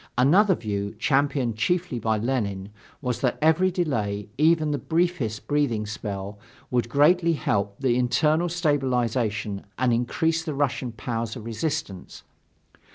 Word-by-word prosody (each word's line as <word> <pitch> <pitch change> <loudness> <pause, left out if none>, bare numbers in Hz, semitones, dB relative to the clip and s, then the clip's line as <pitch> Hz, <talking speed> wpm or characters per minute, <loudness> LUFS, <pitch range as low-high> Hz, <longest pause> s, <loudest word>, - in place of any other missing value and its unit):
Another 185 - +5
view, 100 -4 -4
championed 135 -5 +1
chiefly 175 +1 0
by 110 0 0
Lenin, 105 -5 -2 0.3
was 125 -2 -2
that 125 -3 +1
every 160 +4 +3
delay, 110 - -2
even 155 +1 +3
the 145 - -1
briefest 160 -9 -1
breathing 140 -8 0
spell, 100 -2 -6 0.3
would 120 -2 0
greatly 165 +6 +4
help 100 -8 -1
the 130 -3 +2
internal 155 +7 +2
stabilization 125 - 0
and 125 -2 +2
increase 160 +7 0
the 155 -3 -4
Russian 135 -3 -1
powers 115 -1 -4
of 115 -4 -8
resistance. 115 - -4
125 Hz, 130 wpm, -25 LUFS, 110-155 Hz, 0.3 s, Another